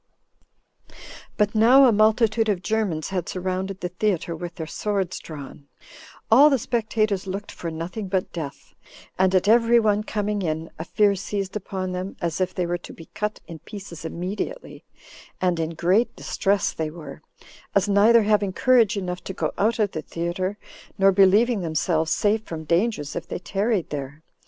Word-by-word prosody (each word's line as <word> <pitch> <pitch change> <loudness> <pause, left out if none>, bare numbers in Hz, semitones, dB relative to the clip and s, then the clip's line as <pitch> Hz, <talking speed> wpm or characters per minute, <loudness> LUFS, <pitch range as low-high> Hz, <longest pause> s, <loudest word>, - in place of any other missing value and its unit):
17. - - -18 0.4
But 210 -1 +2
now 245 +5 +7
a 250 - +6
multitude 220 +1 +3
of 190 -3 -1
Germans 205 -8 -1
had 185 -3 -3
surrounded 185 +1 -3
the 180 - -2
theater 180 -2 -1
with 175 +1 -7
their 165 -4 -5
swords 195 +1 -2
drawn: 145 -2 -10 0.6
all 275 +6 +8
the 275 - +3
spectators 215 -4 -1
looked 195 +2 -5
for 170 - -6
nothing 170 +6 -5
but 185 0 -2
death, 155 -5 -7 0.5
and 190 0 +3
at 185 +1 +2
every 235 +1 +5
one 210 -2 +2
coming 210 -1 -2
in 160 -2 -3
a 160 - -4
fear 205 +2 +3
seized 195 0 -4
upon 190 -2 -4
them, 180 +2 -5
as 170 0 -2
if 185 0 +1
they 180 - 0
were 175 0 -2
to - - -11
be 165 - -13
cut 210 0 -3
in 165 -2 -9
pieces 190 -3 -10
immediately; 185 - -5 0.6
and 180 -2 +1
in 165 0 -2
great 185 +9 +2
distress 200 -1 0
they 160 -1 -3
were, 155 -3 -10 0.5
as 200 0 +3
neither 210 +3 +5
having 205 -2 +1
courage 230 -2 +3
enough 180 -2 -4
to 190 - -6
go - - -1
out 220 +3 +1
of 210 -3 +1
the 155 - -4
theater, 175 +5 -3 0.4
nor 195 0 +5
believing 200 +4 +4
themselves 160 0 0
safe 210 +5 +2
from 165 -6 -7
dangers 170 -2 0
if 170 - -5
they - - -4
tarried 195 +1 -1
there. 145 +1 -6
190 Hz, 175 wpm, -24 LUFS, 170-215 Hz, 0.6 s, all